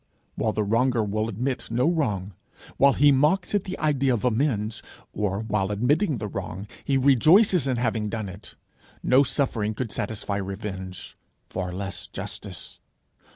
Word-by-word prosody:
While 110 - -1
the 110 - 0
wronger 115 +2 +2
will 110 +2 -1
admit 125 +5 -3
no 120 +2 +1
wrong, 105 - 0 0.4
while 140 0 +6
he 145 +1 +5
mocks 150 +9 +2
at 205 -2 +1
the 185 - -5
idea 140 -4 +2
of 115 - -3
amends, 115 -3 0 0.3
or 100 -1 -1
while, 105 -3 -1
admitting 135 - +1
the 105 0 -4
wrong, 95 0 -5 0.2
he 135 - +1
rejoices 155 - +5
in 130 -2 0
having 110 -3 0
done 110 -2 -3
it, 95 +2 -10 0.5
no 130 +2 +5
suffering 120 -6 0
could 115 -1 -3
satisfy 105 -1 -2
revenge, 95 -2 -6 0.4
far 90 -1 -3
less 95 +1 -5
justice. 100 - -7
110 Hz, 155 wpm, -25 LUFS, 100-135 Hz, 0.5 s, while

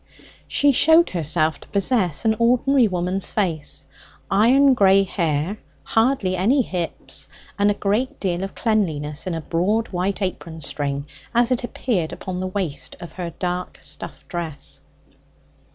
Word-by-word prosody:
She 285 0 +4
showed 320 +6 +5
herself 160 -2 +1
to - - -13
possess 200 - 0
an 220 0 +3
ordinary 250 +2 +4
woman's 180 0 -1
face, 170 -8 -1 0.5
iron 260 +6 +5
grey 195 -4 +5
hair, 170 +1 -1 0.2
hardly 225 -5 +1
any 240 +9 +3
hips, 175 -5 -4 0.3
and 205 0 +4
a 205 - +1
great 210 +6 -1
deal 180 -2 -1
of 195 - -6
cleanliness 160 -9 -1
in 175 - -1
a 165 - -3
broad 195 +8 0
white 190 +2 -1
apron 165 -3 -4
string, 140 0 -3 0.3
as 240 +1 +3
it 250 -1 +1
appeared 215 -9 -1
upon 185 -1 -5
the 185 - -2
waist 170 -8 -3
of 170 - -9
her 180 -2 -4
dark 180 0 -3
stuff - - -6
dress. 165 -6 -6
185 Hz, 145 wpm, -22 LUFS, 170-225 Hz, 0.5 s, showed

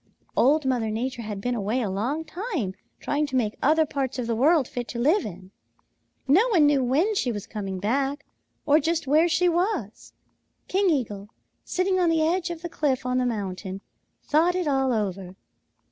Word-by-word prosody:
"Old 290 +4 +3
Mother 245 -4 0
Nature 240 +3 -3
had 210 -3 -5
been 245 +3 -1
away 220 +2 -1
a 230 - -1
long 245 +12 -2
time 335 - -3 0.3
trying 295 +1 -1
to 265 - -5
make 220 -4 +1
other 315 +3 +4
parts 275 -3 -3
of 250 - -2
the 230 0 -1
world 285 +3 +3
fit 245 -1 -5
to - - -6
live 315 - +3
in. 185 0 -11 0.8
No 365 - +5
one 355 -11 +4
knew 290 -2 +3
when 300 - +2
she 265 -11 0
was 205 -2 -5
coming 200 -4 -5
back 270 +8 -1 0.4
or 295 +2 +5
just 325 +1 -1
where 310 +5 +4
she 335 +2 +2
was. 345 - -1 0.5
King 390 0 +2
Eagle, 210 - -2 0.3
sitting 370 +1 0
on 350 -2 +3
the 320 -1 +2
edge 345 +2 0
of 340 -1 -6
the - - -2
cliff 275 -6 -1
on 250 0 +1
the 250 - +1
mountain, 195 -4 -4 0.4
thought 330 +4 +2
it 365 -3 -1
all 270 -2 +1
over. 195 -4 -3
270 Hz, 190 wpm, -25 LUFS, 220-325 Hz, 0.8 s, No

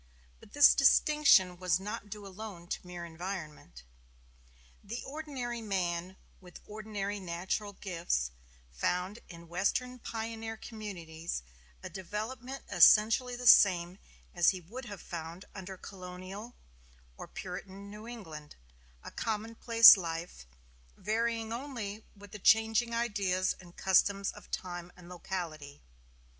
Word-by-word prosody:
But - - -18
this 290 -1 +8
distinction 275 -10 +5
was 180 0 +1
not 210 +1 -6
due 205 0 -8
alone 195 -2 -8
to - - -4
mere 175 -1 -7
environment. 160 - -7 1.0
The 230 +4 -6
ordinary 270 -5 -5
man, 185 -3 -2 0.2
with 180 -2 -13
ordinary 210 -1 -4
natural 190 +3 -3
gifts, 170 - -2 0.4
found 180 - -2
in 170 -1 -11
Western 225 +9 -1
pioneer 225 -1 -5
communities 170 - -6 0.4
a - - -5
development 225 +8 -6
essentially 220 +7 +6
the 250 +1 -7
same 180 -4 +6 0.3
as 175 -2 +5
he 185 - -1
would 230 +10 -9
have 205 -4 -9
found 170 +2 -7
under 190 -1 -8
colonial 185 +5 -9
Virginia - - -29
or - - -8
Puritan 200 +1 -8
New 210 +2 -10
England: 160 -11 -9 0.5
a - - -8
commonplace 230 +1 +6
life, 165 - -5 0.5
varying 225 +1 -1
only 230 -5 -6
with 200 -1 -14
the 210 - -8
changing 225 +3 +4
ideas 200 -5 0
and 175 -1 -15
customs 195 +1 +3
of - - -15
time 175 -1 -5
and 180 -1 -14
locality. 165 -5 -6
195 Hz, 125 wpm, -31 LUFS, 175-225 Hz, 1.0 s, this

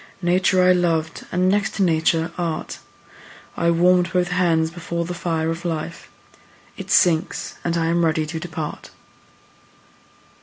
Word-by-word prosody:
Nature 185 +1 +3
I 180 - +6
loved 165 -3 -1
and, 180 +1 +1
next 205 +2 +1
to 200 - +1
Nature, 165 -1 +1
Art: 170 -3 -4 0.8
I 170 - +1
warm'd 175 +1 +3
both 180 -1 +1
hands 165 -3 +1
before 170 0 -4
the 180 - -4
fire 165 -2 -1
of 165 +1 -6
life; 170 0 -5 0.7
It - - -9
sinks, 170 -2 +2
and 170 0 -1
I 165 - 0
am 170 +1 +1
ready 160 -1 +1
to 160 +1 -5
depart. 160 -2 -6
170 Hz, 145 wpm, -21 LUFS, 160-180 Hz, 0.8 s, I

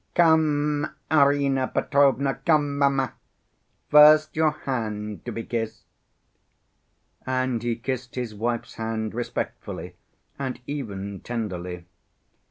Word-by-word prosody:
Come, 150 -3 +3 0.2
Arina 140 -3 +3
Petrovna, 135 -1 +2
come, 145 -3 +2
mamma, 135 -2 +2 0.8
first 155 +1 +7
your 160 0 +4
hand 105 - -4
to - - -4
be 115 - -4
kissed." 115 -2 -4 1.4
And 130 -2 -1
he 120 -1 -1
kissed 125 +1 -5
his 125 -4 -3
wife's 115 +3 -3
hand 110 -1 -3
respectfully 120 +1 -5 0.5
and 130 -2 -3
even 100 -9 -5
tenderly. 90 -7 -5
130 Hz, 100 wpm, -25 LUFS, 115-145 Hz, 1.4 s, first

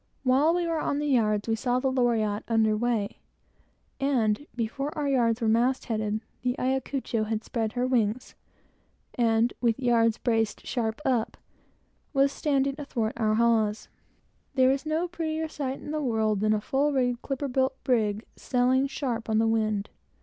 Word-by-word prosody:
While 275 +6 +3
we 350 -1 0
were 330 -1 -1
on 285 - -1
the 295 - -1
yards, 215 -7 +1
we 225 - +1
saw 245 +2 0
the 265 0 0
Loriotte 225 -5 +1
under 220 -2 +2
weigh, 220 -2 -1 0.8
and 260 -2 +1
before 245 +5 -2
our 295 -1 -1
yards 240 -4 +2
were 225 - +1
mast 240 +4 +2
headed, 215 -2 -2 0.2
the 250 0 0
Ayacucho 260 -3 -1
had 220 0 -2
spread 225 -2 -2
her 250 0 0
wings, 240 -2 0 0.8
and, 230 0 +2
with 235 0 +1
yards 235 -3 +3
braced 225 -3 -1
sharp 225 +2 -2
up, 245 -4 0 0.8
was 275 0 +3
standing 275 -2 0
athwart 235 -6 -2
our 215 -2 +1
hawse. 225 -2 +1 0.7
There 260 -1 +5
is 275 +2 -2
no 320 +3 0
prettier 320 -2 -3
sight 275 -3 -4
in - - -7
the 305 0 -1
world 220 -5 +1
than 215 +1 +2
a 210 - -2
full 280 +6 +1
rigged, 245 -3 0
clipper 275 +1 -3
built 260 0 0
brig, 220 -3 +1
sailing 255 +2 +1
sharp 240 -5 -3
on 215 - +2
the 225 - +3
wind. 215 -2 0
245 Hz, 165 wpm, -27 LUFS, 220-270 Hz, 0.8 s, There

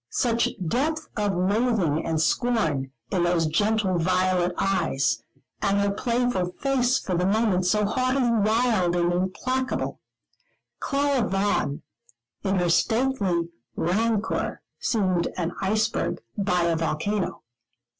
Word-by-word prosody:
Such 235 -1 +1 0.2
depth 310 - -1
of 205 -3 0
loathing 190 -4 +1
and 160 -1 -1
scorn 165 - +1 0.2
in 185 - +1
those 175 -1 +2
gentle 195 +3 +1
violet 185 0 +2
eyes, 140 -11 +1 0.4
and 200 0 +2
her 200 0 +2
playful 235 -5 0
face 260 +1 +1
for 185 - -3
the 180 +2 +1
moment 200 -3 +2
so 210 +2 +2
haughtily 255 +3 +1
wild 215 -4 +2
and 175 0 +1
implacable 255 +9 -2 0.8
Clara 280 -2 +1
Vaughan, 195 -7 0 0.6
in 195 -1 0
her 180 -2 +1
stately 200 -4 +1 0.3
rancour, 215 +5 -1 0.2
seemed 185 -6 +1
an 175 -1 -2
iceberg 215 +3 0 0.2
by 180 -3 +1
a 170 -1 +2
volcano. 165 +5 -2
200 Hz, 115 wpm, -25 LUFS, 175-230 Hz, 0.8 s, those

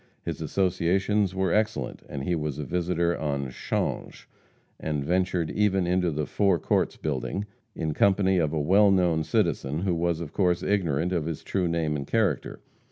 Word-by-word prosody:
His - - -4
associations 95 +2 +1
were 95 -2 +1
excellent, 110 +1 -1
and 65 - -5
he 90 - 0
was 75 -4 -2
a 75 - -3
visitor 85 +2 0
on 70 -3 -2
'Change, - - -3 0.5
and 75 -3 -2
ventured 90 -1 0
even 95 -3 +2
into 90 0 +1
the 75 -1 -2
Four 100 0 +2
Courts - - 0
building, 75 +7 -3 0.3
in 80 -1 -2
company 95 0 +3
with 75 -2 0
a 80 - -1
well 95 +7 +5
known 90 -4 +2
citizen, 75 -1 0
who 95 -2 +1
was, 85 -1 0
of 85 -4 -7
course, 90 -3 +1
ignorant 90 -4 0
of 85 -4 0
his 80 -3 -4
true 95 -3 -1
name 80 -2 0
and 70 -1 -4
character. 100 - 0
85 Hz, 170 wpm, -26 LUFS, 75-95 Hz, 0.5 s, well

